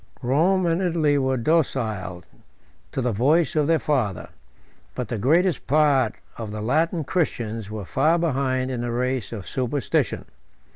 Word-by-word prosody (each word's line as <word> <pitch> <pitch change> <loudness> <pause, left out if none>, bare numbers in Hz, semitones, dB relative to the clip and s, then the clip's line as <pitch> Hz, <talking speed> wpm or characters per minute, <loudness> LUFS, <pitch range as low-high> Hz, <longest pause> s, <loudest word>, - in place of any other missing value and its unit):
Rome 170 +9 +2
and 170 +2 +1
Italy 160 -5 +2
were 130 -1 +1
docile 115 - -1 0.7
to 135 - -2
the 125 - +1
voice 150 - +2
of 150 -2 +2
their 165 0 +4
father; 125 - -1 0.7
but 125 -3 -4
the 115 - -3
greatest 165 - +2
part 140 -5 +3 0.2
of 110 -2 -5
the 105 - -5
Latin 160 - +1
Christians 115 - -2
were 105 -2 -6
far 155 - +2
behind 130 -5 0
in 125 -2 -3
the 120 - -2
race 125 -1 -1
of 105 -5 -7
superstition. 130 0 -1
130 Hz, 150 wpm, -24 LUFS, 115-155 Hz, 0.7 s, their